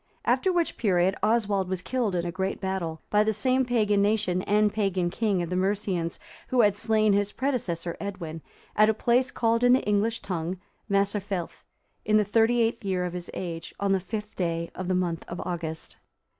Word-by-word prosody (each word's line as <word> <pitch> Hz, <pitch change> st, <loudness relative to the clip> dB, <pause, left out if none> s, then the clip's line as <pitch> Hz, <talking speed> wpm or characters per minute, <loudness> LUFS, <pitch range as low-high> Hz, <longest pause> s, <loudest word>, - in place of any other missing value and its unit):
After 380 Hz, -, +2 dB
which 345 Hz, -2 st, 0 dB
period, 190 Hz, -4 st, +2 dB
Oswald 210 Hz, -3 st, +1 dB
was 185 Hz, -1 st, -2 dB
killed 240 Hz, -6 st, -1 dB
in 175 Hz, 0 st, -1 dB
a 175 Hz, -, -2 dB
great 190 Hz, +2 st, -2 dB
battle, 190 Hz, -4 st, -3 dB
by 210 Hz, 0 st, +5 dB
the 220 Hz, 0 st, +1 dB
same 255 Hz, +5 st, +2 dB
pagan 210 Hz, -4 st, +2 dB
nation 200 Hz, -3 st, +1 dB
and 210 Hz, +1 st, +2 dB
pagan 190 Hz, -5 st, 0 dB
king 200 Hz, -4 st, 0 dB
of 170 Hz, -, -5 dB
the -, -, 0 dB
Mercians, 185 Hz, -3 st, -1 dB, 0.3 s
who 255 Hz, -1 st, +3 dB
had 205 Hz, -2 st, +4 dB
slain 215 Hz, 0 st, +2 dB
his 205 Hz, 0 st, +1 dB
predecessor 205 Hz, -11 st, -2 dB
Edwin, 175 Hz, -6 st, -5 dB, 0.3 s
at 215 Hz, 0 st, +5 dB
a 220 Hz, -, +2 dB
place 245 Hz, +3 st, +2 dB
called 230 Hz, +1 st, +1 dB
in 245 Hz, 0 st, +6 dB
the 260 Hz, -, +3 dB
English 210 Hz, +2 st, +1 dB
tongue 175 Hz, 0 st, -3 dB, 0.3 s
Maserfelth,(340) 200 Hz, -2 st, -1 dB, 0.4 s
in 215 Hz, 0 st, +4 dB
the 210 Hz, -, +4 dB
thirty 225 Hz, +3 st, +3 dB
eighth 230 Hz, 0 st, 0 dB
year 185 Hz, -2 st, 0 dB
of 175 Hz, -, -4 dB
his 180 Hz, -1 st, -6 dB
age, 165 Hz, -2 st, -5 dB
on 200 Hz, -1 st, +1 dB
the 195 Hz, -, +3 dB
fifth 210 Hz, +2 st, -6 dB
day 170 Hz, -2 st, -2 dB
of 185 Hz, -, -5 dB
the 185 Hz, -, +1 dB
month 175 Hz, -2 st, -1 dB
of 175 Hz, -, -6 dB
August. 165 Hz, -3 st, -4 dB
200 Hz, 195 wpm, -27 LUFS, 180-220 Hz, 0.4 s, in